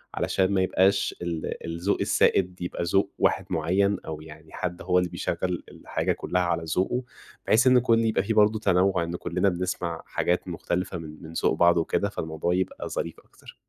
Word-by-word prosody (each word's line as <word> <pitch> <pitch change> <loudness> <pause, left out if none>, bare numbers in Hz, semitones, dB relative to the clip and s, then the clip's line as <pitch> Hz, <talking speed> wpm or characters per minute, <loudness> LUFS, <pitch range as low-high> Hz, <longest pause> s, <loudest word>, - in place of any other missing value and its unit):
علشان 95 0 +1
ما 95 - +3
يبقاش 95 +1 +2
ال 85 -2 -4
الذوق 85 +4 -1
السائد 90 -1 +2
يبقى 90 0 -3
ذوق 95 +3 +1
واحد - - +2
معين 95 +5 +1
أو 80 -1 -6
يعني 80 0 -13
حد 90 -1 -4
هو 90 0 +1
اللي 90 -1 -1
بيشغل 90 -1 -2
الحاجة - - -2
كلها 90 - -1
على 85 -1 0
ذوقه، 125 +7 +1 0.4
بحيث 120 +4 +4
إنه 130 0 +7
يكون 115 -2 +3
يبقى 110 -3 +1
في 110 +3 -1
برضه 105 0 +4
تنوع، 90 -2 +2
إنه 85 +1 -4
كلنا 90 +3 0
بنسمع 90 -2 -3
حاجات 90 +1 -1
مختلفة 90 +1 -3
من 80 -1 -10
من 80 0 -9
ذوق - - +1
بعض 85 0 +4
وكده، 100 +4 0
فالموضوع 80 -1 -2
يبقى 95 0 -2
ظريف 85 - -4
أكتر. - - -17
90 Hz, 180 wpm, -26 LUFS, 85-100 Hz, 0.4 s, إنه